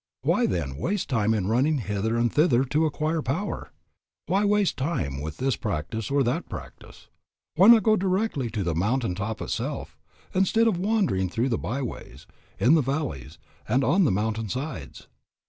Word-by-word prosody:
Why, - - +2
then, 75 -7 -2
waste 195 - -2
time 110 -5 +1
in 100 -4 -1
running 130 +9 +2
hither 110 -1 -1
and 120 0 +1
thither 135 -5 +4
to 150 +4 +1
acquire 155 +1 -1
power? 160 +11 -3 0.5
Why 195 +2 +1
waste 205 -2 +2
time 85 - -2
with 80 +1 -6
this 135 -1 0
practice 105 +2 -4
or 140 0 +2
that 120 0 -2
practice? - - -10 0.5
Why 185 +6 +6
not 230 -2 +8
go 215 +1 +4
directly 190 - 0
to 105 -2 -3
the 85 -2 -1
mountain 105 +5 0
top 100 +4 -4
itself, - - -4 0.3
instead 195 +5 +3
of 195 -6 +1
wandering 190 - +1
through 115 +8 -1
the 115 - 0
by 135 +5 -3
ways, 120 - -8 0.3
in 130 - +5
the 160 - +5
valleys, 135 - -3 0.3
and 130 +5 +2
on 185 +6 +3
the - - +3
mountain 110 +2 -1
sides? 125 - -6
130 Hz, 175 wpm, -26 LUFS, 105-165 Hz, 0.5 s, not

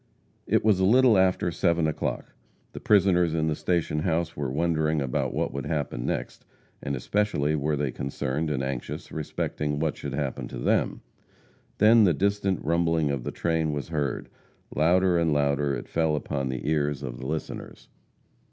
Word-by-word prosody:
It - - +2
was 105 -4 +4
a - - +2
little 120 +3 +5
after 95 -2 +2
seven 85 -1 +1
o'clock. 80 - -3 0.4
The - - -6
prisoners 90 -5 +3
in 80 -1 +1
the 80 -1 0
station 85 -3 0
house 85 0 -1
were 70 -2 -2
wondering 80 +1 +1
about 65 -3 -1
what - - -2
would 70 -1 -4
happen 70 -6 -2
next, - - -4 0.4
and 70 -1 -2
especially 75 - 0
were 75 +1 0
they 70 -2 -1
concerned 70 +4 -3
and 70 -3 -1
anxious 65 -2 -5
respecting 75 -1 -3
what 80 0 -1
should 70 - -6
happen 70 -3 -3
to - - -8
them. - - 0 0.8
Then 110 +2 +6
the 90 -6 +4
distant 100 -1 0
rumbling 80 -2 +1
of 70 -3 -3
the - - -3
train 80 -2 0
was 75 +2 -4
heard; 75 -5 -2 0.5
louder 90 +3 +3
and 85 -1 +2
louder 70 -1 +1
it - - -7
fell 80 -2 +1
upon 70 -2 -2
the 65 +2 -4
ears 75 -2 0
of - - -6
the 65 - -5
listeners. 80 +1 -6
75 Hz, 170 wpm, -26 LUFS, 70-85 Hz, 0.8 s, Then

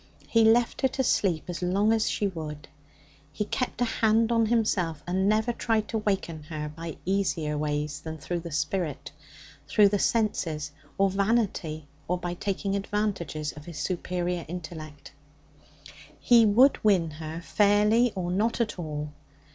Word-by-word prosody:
He 230 -1 +4
left 230 +2 +3
her 265 - +4
to 265 +1 -2
sleep 185 -9 +1
as 175 -1 -5
long 200 +5 +2
as 220 -1 +1
she 210 - -1
would. 150 -4 -7 0.6
He 210 - -3
kept 250 +2 -3
a - - +4
hand 225 0 +2
on 230 -1 +3
himself, 185 -9 0
and 190 +3 +1
never 220 +3 +2
tried 225 -2 0
to 225 - -1
waken 190 -6 -2
her 150 -1 -5
by 165 -1 -6
easier 175 -5 0
ways 150 -1 -2
than 160 0 -6
through 175 +3 -3
the 170 0 -8
spirit 155 0 -2 0.6
through 205 -1 +5
the 205 0 0
senses, 165 -11 0 0.3
or 195 0 +3
vanity, 195 -7 0 0.2
or 180 - 0
by 175 0 -4
taking 195 +2 -2
advantages 195 -7 -2
of 150 0 -12
his 170 -3 -8
superior 180 -1 -2
intellect. 160 -3 -8 1.1
He 235 -2 +6
would 250 +7 +5
win 185 -7 +3
her 155 +1 -6
fairly 210 +5 +3
or 175 -2 -2
not 220 +6 0
at 220 -5 -1
all. 150 -2 -4
185 Hz, 155 wpm, -27 LUFS, 160-215 Hz, 1.1 s, He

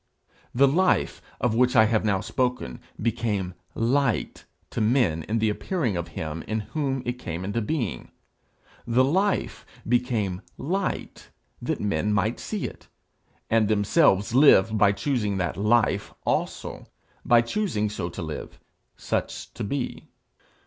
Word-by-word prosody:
The 140 +3 +5
life 180 +7 +2 0.2
of 120 -2 +1
which 125 +2 +3
I 110 -2 +7
have 110 0 +1
now 100 -3 +1
spoken 125 - -2 0.2
became 105 -5 -1 0.2
light 125 0 0 0.3
to 115 - -2
men 110 - +2
in 110 - +1
the 110 -1 +2
appearing 130 - -1
of 85 -1 -3
him 80 +1 -4
in 110 0 -1
whom 135 +2 -2
it 120 +1 -3
came 85 -2 -5
into 105 +4 -1
being. 115 - -3 0.8
The 120 +2 +4
life 190 +9 0 0.2
became 115 -6 0 0.2
light 185 +8 -3 0.3
that - - -2
men 105 0 0
might 105 +3 0
see 210 -3 -3
it, - - -8 0.6
and 110 -2 +3
themselves 105 - +3
live 115 -6 +6
by 105 -2 +5
choosing 105 -3 -1
that 90 -2 -1
life 105 -1 +1
also, - - -2 0.4
by 120 -1 +5
choosing 120 - -1
so 95 -5 -4
to 85 - -6
live, 80 -1 -7 0.4
such - - -3
to - - -5
be. 130 +5 -3
115 Hz, 140 wpm, -25 LUFS, 100-130 Hz, 0.8 s, I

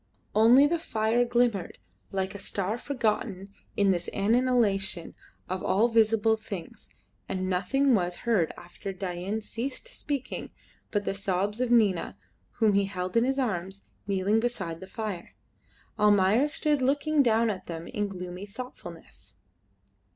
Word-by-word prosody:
Only 235 +6 +7
the 335 +3 +1
fire 225 -4 +1
glimmered 240 -6 +1 0.3
like 190 0 -2
a 200 - -7
star 200 +3 -2
forgotten 210 -7 -2 0.2
in 200 -1 +4
this 175 -2 -2
annihilation 205 -5 +1 0.3
of 185 +1 -3
all 220 +5 +3
visible 225 -1 +3
things, 200 -6 -8 0.4
and 185 -1 -2
nothing 250 +10 +2
was 180 -4 +1
heard 205 -9 +2
after 175 +3 -8
Dain 185 +3 -3
ceased 250 - -5
speaking 285 - -4 0.4
but 205 -2 -1
the - - 0
sobs 200 +3 -1
of 250 - +1
Nina, 215 -7 +2 0.4
whom 220 -3 +3
he 200 0 +3
held 185 -1 -4
in 230 - +5
his 270 +1 0
arms, 195 -6 -2 0.2
kneeling 200 +2 +2
beside 190 -9 -3
the 190 - -9
fire. 205 -4 -6 0.6
Almayer 210 +5 +4
stood 295 -1 +1
looking 290 +3 +2
down 230 -3 +3
at 190 - -7
them 165 -1 -6
in 210 -2 -2
gloomy 180 0 -7
thoughtfulness. 175 - -10
205 Hz, 140 wpm, -28 LUFS, 190-240 Hz, 0.6 s, Only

